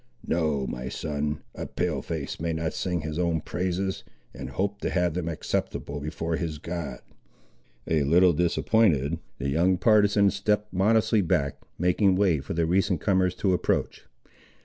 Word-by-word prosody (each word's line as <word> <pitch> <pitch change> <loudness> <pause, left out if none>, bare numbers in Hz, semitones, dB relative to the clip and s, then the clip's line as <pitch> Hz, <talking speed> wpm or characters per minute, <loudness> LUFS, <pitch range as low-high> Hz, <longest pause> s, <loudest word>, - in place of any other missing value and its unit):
No, 75 -5 0
my 65 0 -5
son; 75 -1 -3
a - - -6
Pale 85 -3 -2
face 80 -4 -5
may 85 +1 -1
not 80 0 -2
sing 90 -3 -2
his 80 +1 -4
own 85 -2 +1
praises, 90 +4 -2 0.3
and - - -7
hope 100 +1 -2
to - - -1
have 90 -3 +1
them 85 -1 -3
acceptable 75 -2 -3
before 80 +3 -3
his 80 -4 -3
God." 85 -5 -5 0.9
A 80 -2 +2
little 85 +5 +5
disappointed, 80 - +2 0.2
the 70 - -2
young 90 +6 +2
partisan 105 -1 +4
stepped 105 -1 -1
modestly 110 +3 +3
back, 70 -5 0 0.2
making 90 +2 +3
way 90 -6 +3
for 70 - -5
the 85 0 +2
recent 95 +1 +1
comers 95 0 +1
to 95 0 +1
approach. 90 - -1
85 Hz, 155 wpm, -26 LUFS, 75-95 Hz, 0.9 s, little